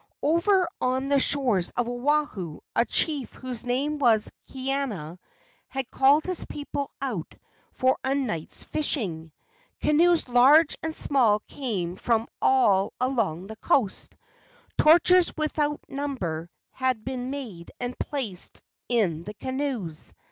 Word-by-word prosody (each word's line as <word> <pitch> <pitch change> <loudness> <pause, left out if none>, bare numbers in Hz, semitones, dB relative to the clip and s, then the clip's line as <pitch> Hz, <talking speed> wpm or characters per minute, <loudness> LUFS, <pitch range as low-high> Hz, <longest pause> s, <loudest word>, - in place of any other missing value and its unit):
Over 350 +4 +3
on 260 +2 0
the 280 -1 +4
shores 250 -11 +2
of 245 -1 +1
Oahu 245 - -1 0.2
a - - +3
chief 290 -3 +1
whose 250 -2 -5
name 285 +5 0
was 225 -6 +3 0.2
Kaena 260 - -3 0.5
had 265 -1 -5
called 280 +3 +4
his 365 -1 0
people 285 -1 -5
out 240 - -4 0.4
for 260 0 +1
a 265 +1 +1
night's 215 - -3
fishing. 185 - -2 0.5
Canoes 330 +2 +3
large 275 +6 +6
and 320 0 -3
small 230 -7 +2
came 200 -12 -4
from 230 +1 0
all 205 -6 +3
along 230 -10 0
the 220 +2 -9
coast. 225 -4 0 0.6
Torches 345 +3 +6
without 300 -1 -1
num¬ 280 0 -4
ber 165 -4 -4 0.2
had 255 -4 -1
been 255 -1 -4
made 230 -12 -7
and 245 0 -4
placed 235 - -3 0.3
in 195 -10 +1
the 210 +3 -8
canoes. 260 - -3
255 Hz, 125 wpm, -26 LUFS, 210-285 Hz, 0.6 s, large